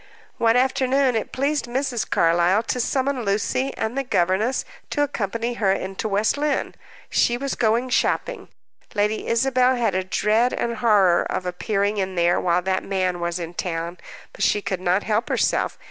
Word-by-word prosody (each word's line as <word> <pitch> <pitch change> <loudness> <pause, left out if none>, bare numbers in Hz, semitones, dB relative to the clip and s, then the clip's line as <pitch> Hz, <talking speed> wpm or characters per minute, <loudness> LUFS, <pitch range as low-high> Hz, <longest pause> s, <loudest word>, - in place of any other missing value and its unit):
One 230 0 +3
afternoon 260 0 +2
it 220 - -2
pleased 280 0 -1
Mrs. 250 -1 -2
Carlyle 175 +5 +3
to 250 - -2
summon 265 +1 0
Lucy 215 +6 0
and 220 +3 -2
the 275 - 0
governess 210 +2 0 0.2
to 290 - +1
accompany 230 -2 -2
her 195 -2 +3
into 190 +2 -3
West 210 +7 +1
Lynne. 295 -1 -1 0.4
She 240 - +2
was 275 +2 -3
going 235 +3 +1
shopping. - - 0 0.5
Lady 210 +1 0
Isabel 255 +2 +2
had 230 -5 0
a 185 0 0
dread 215 +6 +1
and 235 -1 -2
horror 200 -7 +4
of 185 - -3
appearing 200 +3 -1
in 190 -1 -2
there 175 0 +2
while 175 0 +1
that 190 0 0
man 185 -2 -1
was 170 0 -2
in 170 -1 -6
town, 170 0 -4 0.3
but - - -10
she 210 - +3
could 190 -2 -4
not 185 +2 +1
help 220 +1 -1
herself. - - 0
215 Hz, 170 wpm, -23 LUFS, 185-250 Hz, 0.5 s, horror